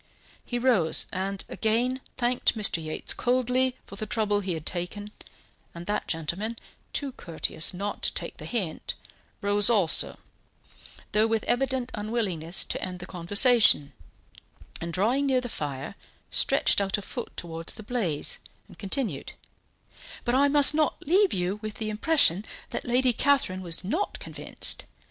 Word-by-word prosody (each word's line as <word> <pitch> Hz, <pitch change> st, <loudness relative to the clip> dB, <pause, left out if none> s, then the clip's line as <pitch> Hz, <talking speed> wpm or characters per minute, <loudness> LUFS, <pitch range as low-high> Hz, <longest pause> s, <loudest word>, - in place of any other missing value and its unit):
He 245 Hz, -, -3 dB
rose, 235 Hz, -10 st, +2 dB
and 195 Hz, +1 st, -3 dB
again 245 Hz, +4 st, 0 dB, 0.2 s
thanked 245 Hz, -1 st, +1 dB
Mr. 190 Hz, -6 st, +2 dB
Yates 155 Hz, 0 st, -1 dB
coldly 255 Hz, +1 st, +1 dB
for 200 Hz, -, -11 dB
the 215 Hz, -, -3 dB
trouble 210 Hz, -1 st, +1 dB
he 190 Hz, -3 st, -2 dB
had 160 Hz, -1 st, -7 dB
taken, 205 Hz, +4 st, -3 dB, 0.6 s
and 170 Hz, 0 st, -8 dB
that 210 Hz, +2 st, -2 dB
gentleman, 175 Hz, +8 st, -2 dB, 0.3 s
too 280 Hz, -2 st, -3 dB
courteous 165 Hz, -6 st, 0 dB
not 200 Hz, +3 st, -4 dB
to -, -, +3 dB
take -, -, -4 dB
the -, -, -8 dB
hint, 195 Hz, -10 st, -3 dB, 0.5 s
rose 205 Hz, +1 st, +4 dB
also, 200 Hz, -8 st, +3 dB, 0.9 s
though 215 Hz, +1 st, +3 dB
with 225 Hz, -1 st, 0 dB
evident 255 Hz, 0 st, 0 dB
unwillingness 195 Hz, -6 st, -1 dB
to -, -, -4 dB
end 185 Hz, -1 st, -3 dB
the 180 Hz, -, -7 dB
conversation, 195 Hz, -, +4 dB, 0.9 s
and, 170 Hz, 0 st, -4 dB
drawing 235 Hz, -, +1 dB
near 260 Hz, -2 st, +3 dB
the 245 Hz, -1 st, -5 dB
fire, 140 Hz, -6 st, -5 dB, 0.4 s
stretched -, -, +4 dB
out 195 Hz, +1 st, 0 dB
a 205 Hz, -, -7 dB
foot 240 Hz, -, -7 dB
towards 165 Hz, -1 st, -5 dB
the 220 Hz, -, -9 dB
blaze, 205 Hz, -10 st, -1 dB, 0.3 s
and 185 Hz, -5 st, -17 dB
continued: 200 Hz, -, -2 dB, 0.9 s
"But 240 Hz, -, +1 dB
I 275 Hz, +2 st, +4 dB
must 285 Hz, +1 st, +7 dB
not 305 Hz, -1 st, 0 dB
leave 380 Hz, +5 st, +4 dB
you 185 Hz, +3 st, -1 dB
with 215 Hz, -1 st, -5 dB
the 215 Hz, -1 st, -3 dB
impression 215 Hz, -, +3 dB, 0.3 s
that -, -, -3 dB
Lady 250 Hz, +1 st, +3 dB
Catherine 245 Hz, -8 st, +2 dB
was 170 Hz, -1 st, -3 dB
not 325 Hz, -, -2 dB
convinced. -, -, -1 dB
210 Hz, 150 wpm, -27 LUFS, 180-250 Hz, 0.9 s, must